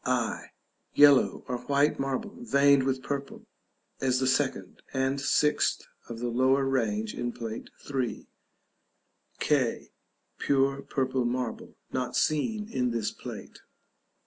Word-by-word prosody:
i. 125 -3 -1 0.5
Yellow 145 -2 +6
or 125 -1 -2
white 140 +4 +1
marble 135 - -3
veined 140 - +4
with 130 0 -1
purple 140 -1 -5 0.5
(as 130 -1 +1
the 130 - +1
second 130 - -1
and 135 +1 0
sixth 150 +2 +2 0.3
of 115 - -6
the 120 +1 -3
lower 130 +3 +2
range 110 -5 0
in 120 - -3
Plate 115 -1 -6 0.2
III.). 130 -4 -2 1.1
k. 135 -6 0 0.5
Pure 140 0 +1
purple 130 -1 0
marble, 120 0 -3 0.2
not 125 -1 -2
seen 210 +8 0
in 125 - -1
this 115 -2 -1
plate. - - -9
130 Hz, 120 wpm, -28 LUFS, 125-140 Hz, 1.1 s, Yellow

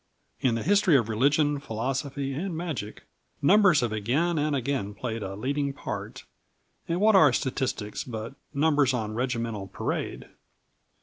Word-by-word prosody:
In 125 -3 +2
the 115 - -2
history 195 -4 +4
of 115 -3 -1
religion, 145 +6 +2
philosophy 135 +3 -3
and 170 +4 -3
magic, 150 - -5 0.4
numbers 190 -1 +5
have 120 -3 -1
again 140 +11 0
and 150 0 +1
again 130 -6 -2
played 115 0 -4
a 95 -1 -5
leading 140 +5 -1
part; - - -6 0.6
and 170 +1 -1
what 215 +1 +5
are 155 -8 +7
statistics 125 -5 -2
but 115 0 -6 0.2
numbers 145 -3 +2
on 110 -3 -3
regimental 115 -4 -2
parade? - - -4
135 Hz, 140 wpm, -27 LUFS, 115-150 Hz, 0.6 s, are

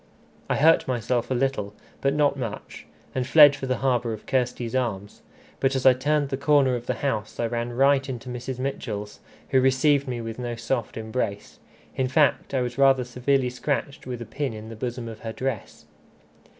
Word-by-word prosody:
I - - +2
hurt 160 +3 +4
myself 120 -1 -1
a 130 - 0
little, 120 -6 -1 0.3
but 140 +1 +1
not 145 -2 +3
much, 115 -6 -7 0.3
and 130 -1 -2
fled 145 0 +8
for 135 -2 -5
the 130 -1 0
harbour 120 -3 +1
of 110 - -9
Kirsty's 125 -2 -1
arms. 105 -6 -3 0.4
But 135 0 +1
as 130 - -2
I 130 - +8
turned 145 +2 0
the 135 - -2
corner 140 -2 +3
of 120 0 -6
the 125 - 0
house 110 -6 -2
I 120 - +1
ran 120 +1 -3
right 135 +1 +3
into 125 -1 -6
Mrs. 125 +1 -5
Mitchell's, 110 -6 -4 0.3
who 130 - +4
received 135 +2 +3
me 125 -2 -3
with 115 0 -6
no 120 -1 -3
soft 115 +1 -3
embrace. 110 -2 -4 0.4
In 130 - 0
fact 140 +1 +2
I 130 - +2
was 125 +2 -4
rather 135 -2 +5
severely 125 +1 0
scratched 140 +1 -3
with 125 -2 -4
a. - - -11
pin 140 +1 -3
in 110 0 -8
the 115 - -8
bosom 120 +1 -4
of 110 -1 -8
her 110 -1 -6
dress. 130 -5 -5
125 Hz, 195 wpm, -25 LUFS, 115-135 Hz, 0.4 s, fled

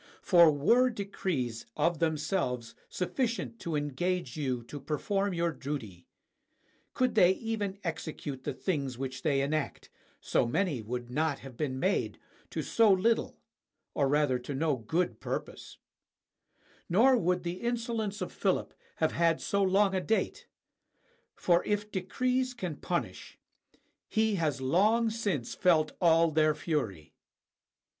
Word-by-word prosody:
For 170 -4 +7
were 235 - +4
decrees 185 - -3
of 170 -2 +1
themselves 150 -7 -1 0.2
sufficient 230 +4 -2
to 165 -2 -3
engage 145 0 -2
you 130 -5 -2
to 145 +5 -8
perform 195 - -1
your 170 0 +1
duty 130 - -6 0.4
— - - -40
could 255 -1 +1
they 185 -4 +6
even 210 -2 -3
execute 155 -5 -5
the - - -3
things 140 -9 -2
which 130 0 -5
they 140 -4 +2
enact, 150 +1 -2 0.3
so - - +1
many 145 - 0
would 120 +2 -5
not 150 +1 0
have 130 -2 -10
been 130 -1 -2
made 190 +5 0 0.3
to - - -3
so 225 -3 +4
little 220 +5 +2 0.6
or 140 - +2
rather 145 -3 +2
to 130 +3 -6
no 150 +1 +1
good 125 +2 -1
purpose; - - -5 1.1
nor 245 +9 +5
would 180 -5 +1
the 175 +1 -4
insolence 230 -3 -2
of - - -3
Philip - - 0 0.2
have - - +1
had 165 -1 +2
so 200 - 0
long 195 +1 +3
a 185 - +1
date: 220 +4 -1 0.9
for 175 -1 +2
if 210 0 -2
decrees 250 +7 -1
can 180 -9 -4
punish, 175 -1 -4 0.7
he 220 0 +2
has 155 -7 -1
long 215 - +3
since 200 - -2
felt 155 -4 +3
all 165 -1 +5
their 155 0 +3
fury. 110 - -3
170 Hz, 135 wpm, -30 LUFS, 140-200 Hz, 1.1 s, For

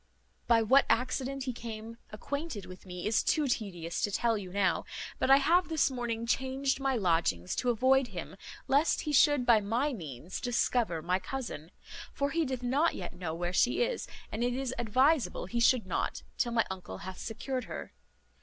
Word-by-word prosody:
By 230 -1 +5
what 265 +5 +5
accident 260 +2 0
he 255 -1 -3
came 230 0 -7
acquainted 280 - -5
with 185 +1 -12
me 180 -1 -6
is 220 +1 +3
too 305 -2 +1
tedious 175 -9 -3
to - - +1
tell 230 +3 +1
you 190 -4 -6
now; 195 0 +1 0.4
but - - +1
I 270 - +9
have 345 +6 +3
this 315 -4 +2
morning 235 -2 -3
changed 265 +3 0
my 270 -1 +1
lodgings 165 - +1
to 250 - +1
avoid 260 +3 +3
him, 185 -3 -7 0.3
lest 285 +4 +3
he 300 - -3
should 290 -2 +5
by 235 -2 +6
my 240 +8 0
means 160 - -7
discover 235 -8 0
my 180 +2 +1
cousin; 185 - -6 0.4
for 280 0 -1
he 330 -1 +1
doth 260 -2 -4
not 280 +7 +2
yet 175 - -6
know 175 -3 -4
where 175 +1 -3
she 245 - +3
is, - - -2 0.2
and 220 +3 -2
it 245 0 0
is 260 -1 -2
adviseable 260 +6 +2
he 235 +5 -2
should 235 -1 +4
not, 185 - -2
till 240 -2 0
my 225 -1 +3
uncle 180 - -7
hath 190 -1 -7
secured 250 +2 -4
her. - - -7
235 Hz, 185 wpm, -31 LUFS, 190-270 Hz, 0.4 s, I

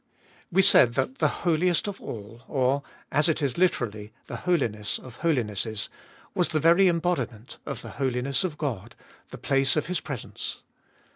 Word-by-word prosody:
WE 190 +2 +5
said 120 -9 +6
that 265 0 -1
the - - +4 0.2
Holiest 175 +2 +2
of 200 -1 -5
All, 110 +1 -8
or, 135 0 +1 0.3
as 150 +3 +3
it 155 - +1
is 140 -5 -1
literally, 110 - 0
the - - -6
Holiness 115 - 0
of 125 -2 -12
Holinesses, 110 - -1 0.4
was 180 - +2
the 155 - 0
very 170 +5 +6
embodiment 165 -10 -1
of - - -5
the - - -7
holiness 130 +2 0
of 170 -5 -3
God, 120 -8 -4 0.3
the - - -8
place 135 -1 +2
of 155 - +1
His 180 -1 -1
presence. 135 -6 -6
140 Hz, 160 wpm, -27 LUFS, 115-170 Hz, 0.4 s, said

